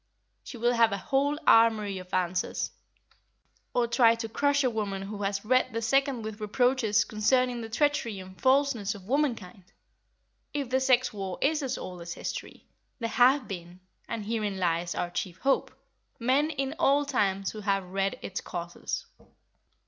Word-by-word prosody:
She 245 - -9
will 240 +1 +2
have 230 -2 +4
a 200 - -1
whole 280 +7 0
armoury 215 -4 +4
of 185 0 -12
answers. 180 -1 -1 1.0
Or 245 - +2
try 235 -1 +4
to 230 0 -4
crush 285 +5 +1
a 255 - +3
woman 200 -3 -3
who 205 +1 -6
has 200 +1 -2
read 255 +2 +2
the 230 - -2
second 270 0 +1
with 215 0 -6
reproaches 225 0 +2
concerning 245 +3 +1
the 225 - -6
treachery 240 -5 0
and 185 0 -12
falseness 260 -7 +2
of 195 -2 -12
womankind! 230 -8 -1 0.9
If 275 -4 -2
the 260 - +3
sex 255 -2 +3
war 195 -3 -4
is 305 +2 +1
as 265 -2 -2
old 180 -1 -7
as 170 0 -6
history, - - -6 0.3
there 230 -2 -3
have 260 +3 +4
been—and 185 +3 -8
herein 210 -3 -2
lies 170 -1 0
our 175 - -2
chief 175 0 -4
hope—men 270 +2 -1
in 275 -2 -2
all 290 -2 +3
times 195 -8 0
who 215 - -8
have 195 -1 0
read 195 +2 -1
its 190 - -4
causes. 175 -1 -5
225 Hz, 160 wpm, -28 LUFS, 195-260 Hz, 1.0 s, have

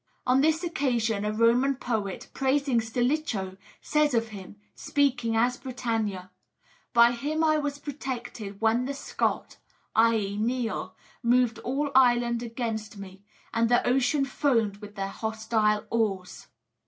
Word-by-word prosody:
On 255 +1 +4
this 320 +3 +2
occasion 240 - 0
a 210 - 0
Roman 235 +5 +3
poet, 220 -7 -3
praising 270 -2 +1
Stilicho, 225 -4 -1 0.3
says 300 -3 +2
of 230 -1 0
him 200 -1 -10 0.2
speaking 245 -5 0
as 245 +2 +2
Britannia: 225 -8 -3 0.6
"By 235 0 +6
him 290 +6 -2
was 305 -3 +1
I - - -22
protected 245 -8 -6
when 225 +3 +2
the 280 +1 -3
Scot - - -2 0.4
[i.e., 220 -3 +2
Niall] 235 +1 -2 0.3
moved 245 -1 +2
all 280 +3 -2
Ireland 240 -2 +4
against 225 -3 -4
me, 195 -1 -10 0.3
and 230 0 +2
the 240 - +3
ocean 270 +3 +2
foamed 235 -7 +1
with 210 0 -11
their 195 -1 -2
hostile 220 0 0
oars." 200 -5 -2
235 Hz, 130 wpm, -27 LUFS, 220-265 Hz, 0.6 s, By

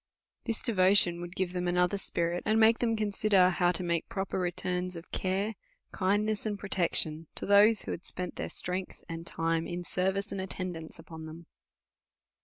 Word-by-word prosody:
This 225 - -2
devotion 185 -4 +4
would 175 +1 -7
give 185 -1 -1
them 180 -1 -2
another 180 +2 +2
spirit, 170 -1 -1
and 215 +1 +2
make 225 +1 +5
them 230 -2 +1
consider 205 -3 +3
how 175 0 +2
to 180 - -1
make 170 -2 -1
proper 195 -1 -2
returns 180 0 -2
of 170 +1 -10
care, 195 +3 -1 0.4
kindness, 205 +3 +1
and 210 -2 -2
protection 165 -5 0
to - - 0
those, 205 +2 +5
who - - -5
had 175 - -5
spent 180 -2 -5
their - - -4
strength 180 +1 -4
and 165 0 -6
time 165 0 -1
in 175 0 -4
service 190 +3 -1
and 195 - -3
at 190 - -5
tendance 175 -4 -4
u})on 160 -1 -10
them. 165 +2 -10
185 Hz, 180 wpm, -30 LUFS, 175-200 Hz, 0.4 s, make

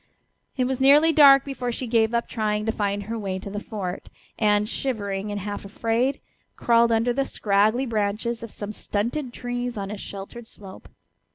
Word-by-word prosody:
It 255 - +2
was 260 0 -2
nearly 295 +4 +6
dark 275 -3 +7
before 255 -3 -3
she 255 - -4
gave 230 -1 +2
up 235 - 0
trying 215 -2 -1
to 225 - +1
find 205 -2 -2
her 225 +3 -4
way 195 -3 -3
to 195 +1 -7
the 205 - -3
fort, 195 -4 -6 0.3
and, 210 -1 +3
shivering 210 -5 -3
and 205 0 -3
half 205 +1 -5
afraid, 230 +6 -1 0.4
crawled 235 0 +3
under 230 +2 +2
the 275 +2 +1
scraggly 215 +2 +1
branches 220 +1 -1
of 230 - -7
some 205 0 -6
stunted 240 +7 -3
trees 245 -1 -4
on 200 0 -4
a 210 - -5
sheltered 200 +5 -8
slope. 195 -4 -12
225 Hz, 180 wpm, -24 LUFS, 205-245 Hz, 0.4 s, dark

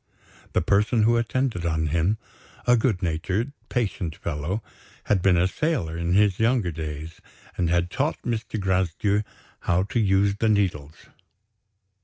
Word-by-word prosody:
The - - +2
person 105 +3 +3
who 115 +2 +4
attended 120 -4 0
on 80 -1 0
him, 85 +7 +1 0.5
a 125 - +5
good 110 -6 +1
natured, 90 - -1 0.2
patient 100 - -2
fellow, 85 +8 -3 0.4
had 100 -3 +1
been 90 -1 +4
a 90 +2 +3
sailor 95 - -1
in 85 +1 -1
his 100 -1 +3
younger 115 -5 +2
days, 80 0 -6 0.3
and 85 -2 0
had 85 +1 +1
taught - - -1
Mr. 115 -2 -3
Gracedieu 95 +2 +1 0.4
how 90 +2 +1
to 105 +4 -1
use 100 -1 +2
the 110 +1 +1
needles. 85 -8 -1
95 Hz, 145 wpm, -25 LUFS, 85-110 Hz, 0.5 s, a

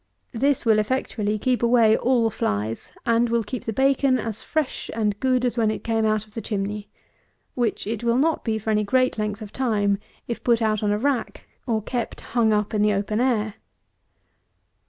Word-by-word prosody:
This 275 +3 +1
will 220 -2 +4
effectually 215 -2 -1
keep 250 +3 0
away 235 -2 +5
all 235 -2 +2
flies; 105 - -2
and 235 0 +3
will 235 0 +1
keep 245 +4 -6
the 225 - -1
bacon 270 +2 +3
as 220 -2 -4
fresh 310 -4 -2
and 210 -2 0
good 255 -1 +2
as 245 -1 0
when 220 -2 +3
it 215 - -3
came 225 -1 +1
out 215 0 0
of 210 - -25
the 225 - -4
chimney, 205 0 -3 0.6
which 240 -4 -1
it 220 +2 -3
will 235 0 +2
not 320 +4 +1
be 220 -2 0
for 220 +1 -2
any 210 0 +2
great 255 +2 +1
length 210 +1 -2
of 205 - -11
time, 205 -6 +1 0.3
if 235 - -4
put 235 -2 +3
on 215 -2 +1
a 205 - +1
rack, 260 0 -2 0.2
or 220 -3 0
kept 240 0 -4
hung 230 -2 +1
up 210 0 0
in 210 - +1
the 210 0 +3
open 210 +3 -1
air. 220 -5 +1
225 Hz, 195 wpm, -24 LUFS, 210-245 Hz, 0.6 s, away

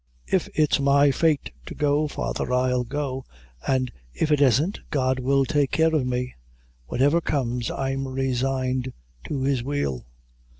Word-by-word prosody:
"If - - 0
it's 150 -2 +3
my 140 +1 +4
fate 155 +1 +1 0.2
to - - -7
go, 150 0 +2
father, 145 - -3
I'll 125 0 +2
go, 135 0 -3 0.4
an 130 -1 +1 0.3
if 155 - 0
it 150 -1 +3
isn't 140 - +3
God 130 -3 +1
will 135 +1 +2
take 145 -2 +1
care 160 0 +2
of 140 -5 +1
me; 125 0 -2 0.5
whatever 145 - +2
comes, 125 -6 -1
I'm 135 0 -2
resigned 130 0 -1 0.3
to 135 -3 -2
His 135 -3 +1
will." 120 - -2
135 Hz, 145 wpm, -24 LUFS, 130-145 Hz, 0.5 s, my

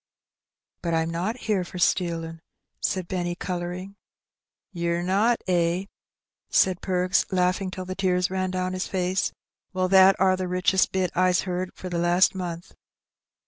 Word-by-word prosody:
"But 170 -1 -1
I'm 160 0 0
not 190 +9 -3
here 205 -4 0
for 180 - -9
stealin'," 165 -2 0 0.4
said 185 -2 -1
Benny, 175 -2 -2
colouring. 180 +2 -5 0.8
"Ye're 170 0 -1
not, 205 +6 +2
eh?" 175 +1 +1 0.6
said 185 -2 +3
Perks, 185 0 +1
laughing 185 +1 +1
till 185 0 -6
the 185 - -4
tears 185 -1 0
ran 185 0 -1
down 185 0 -2
his 185 0 -3
face. 185 0 0 0.2
" - - -57
Well, 185 0 +1
that 190 0 +6
are 185 0 +4
the 185 0 -3
richest 185 +1 +2
bit 185 -1 0
I's 180 -1 +3
heard 180 0 -3
for 185 - -8
the 175 -1 -2
last 175 +2 +4
month." 175 -2 -6
185 Hz, 155 wpm, -25 LUFS, 175-185 Hz, 0.8 s, that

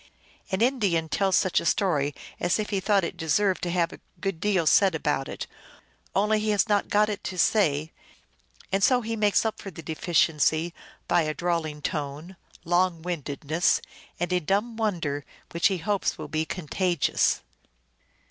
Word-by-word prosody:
An 190 +2 -1
Indian 200 -11 +1
tells 195 +1 +2
such 185 - +2
a - - -6
story 150 -8 +1 0.2
as 175 - +1
if 215 -1 -3
he 200 - +1
thought 195 0 +2
it 170 - -3
deserved 185 +4 +1
to 175 - -2
have 170 -1 0
a - - -11 0.2
good 195 -4 -3
deal 190 -3 +1
said 190 +3 +5
about 145 -3 -1
it, - - -5 0.7
only 210 +2 +3
he 215 0 -1
has 210 +1 +2
not 205 -2 +2
got 210 +1 +3
it 210 -1 -4
to 185 - -4
say; 160 -6 +2 0.8
and 195 +1 +1
so 250 -1 +4
he 225 0 -3
makes 210 0 +2
up 220 - -2
for 195 - -7
the 165 -2 -10
de 160 - -4
ficiency 160 0 +2 0.3
by 175 - +3
a 155 -1 -2
drawling 165 -4 -2
tone, 150 +5 -4 0.3
long 175 -1 +1
windedness, 160 -1 0 0.4
and 175 +1 -1
a 180 - +3
dumb 200 +7 -1
won 215 -5 0
der 145 -1 -2 0.3
which 170 - +3
he 195 -2 -1
hopes 200 +4 -1
will 155 - -6
be 155 +2 -1
contagious." 180 +1 0
180 Hz, 175 wpm, -26 LUFS, 160-205 Hz, 0.8 s, said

